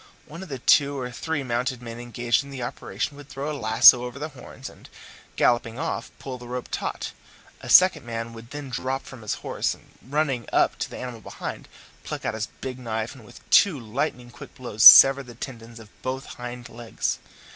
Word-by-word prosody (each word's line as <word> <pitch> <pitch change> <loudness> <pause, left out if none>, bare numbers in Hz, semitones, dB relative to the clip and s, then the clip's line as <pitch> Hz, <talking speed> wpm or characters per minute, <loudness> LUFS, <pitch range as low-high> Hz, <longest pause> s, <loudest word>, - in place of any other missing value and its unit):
One 165 +4 -10
of 190 - -9
the 135 - -4
two 140 +2 +3
or 125 -1 -4
three 145 +3 -3
mounted 125 +1 -2
men 115 -1 -8
engaged 120 +1 -1
in 140 - -12
the 135 -3 -6
operation 120 +2 -4
would 145 0 -13
throw 145 +3 -4
his 145 - -7
lasso 110 +3 +7
over 125 +1 -7
the 150 +3 -5
horns, 135 -1 -11
and, - - -14 0.5
galloping 120 -1 +1
off, 165 +3 -3
pull 130 -2 -7
the 120 - -11
rope 125 0 -5
taut; - - -4 0.5
a - - -9
second 185 -5 +6
man 115 0 -5
would 115 0 -12
then 145 -2 -8
drop 130 +2 -3
from 130 -3 -12
his 105 - -3
horse, - - -1
and - - -23
running 135 -3 -2
up - - +2
to - - -3
the - - -9
animal 125 -3 -7
behind, - - -7 0.4
pluck - - -6
out - - -1
his 110 0 -3
big 130 -1 -5
knife 110 -1 -4
and 130 -4 -15
with 105 - -16
two 180 -9 +5
lightning 120 +1 -4
quick - - -13
blows 120 -5 -6
sever 135 +3 +11
the 125 -3 -12
tendons 115 -2 -9
of 110 - -13
both 130 +1 -4
hind 120 0 -8
legs. 115 -1 -4
125 Hz, 205 wpm, -24 LUFS, 115-140 Hz, 0.5 s, sever